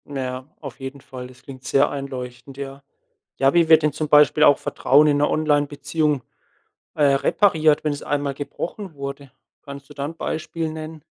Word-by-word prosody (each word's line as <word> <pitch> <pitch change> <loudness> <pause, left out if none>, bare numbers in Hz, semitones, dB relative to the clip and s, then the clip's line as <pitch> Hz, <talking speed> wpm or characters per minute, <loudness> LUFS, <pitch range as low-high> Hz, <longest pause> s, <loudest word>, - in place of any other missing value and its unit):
Na 140 -2 -5
ja, 130 0 -5 0.2
auf 140 -4 -9
jeden 135 +1 -7
Fall. 125 -1 -9
Das 130 0 -18
klingt 130 -2 -11
sehr 135 +2 +3
einleuchtend, 130 -1 -7
ja. 140 0 -7 0.5
Ja, 135 0 +3
wie 170 -2 +3
wird 160 -1 +7
denn 150 -2 +1
zum 155 0 -3
Beispiel 150 +1 +5
auch 145 - +7
Vertrauen 145 +3 +3
in 145 -1 +3
'ner 145 +1 +2
Onlinebeziehung, 145 -1 0 0.7
äh, 150 - +2
repariert, 155 0 +3
wenn 150 - +1
es 145 - -6
einmal 145 -1 -1
gebrochen 165 +6 -6
wurde? 140 -1 -7 0.3
Kannst 140 -1 -10
du - - -11
da 140 - -4
'n 160 +3 -6
Beispiel 160 0 -3
nennen? 155 -1 -8
145 Hz, 185 wpm, -22 LUFS, 135-155 Hz, 0.7 s, wird